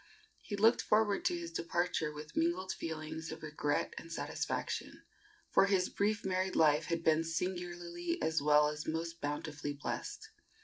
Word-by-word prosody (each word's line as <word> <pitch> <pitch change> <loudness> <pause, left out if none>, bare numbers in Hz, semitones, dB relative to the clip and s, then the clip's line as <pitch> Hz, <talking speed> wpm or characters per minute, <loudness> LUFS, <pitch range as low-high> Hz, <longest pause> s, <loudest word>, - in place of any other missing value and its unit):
He 205 - -4
looked 220 +4 +5
forward 210 -2 +2
to 175 - +2
his 170 -1 -6
departure 170 -1 0
with 150 +1 -9
mingled 180 +3 +1
feelings 160 0 -5
of 160 - -8
regret 150 -1 -1
and 165 - -11
satisfaction, - - -3 0.5
for 195 - +6
his 190 -2 +2
brief 210 +1 0
married 185 0 0
life 150 -1 +5
had 170 0 -1
been 160 0 +4
singularly 175 0 -3
as 160 -1 +1
well 150 0 +5
as 150 0 -5
most 165 +1 -3
bountifully 145 0 -3
blessed. 145 - -5
165 Hz, 150 wpm, -34 LUFS, 155-180 Hz, 0.5 s, for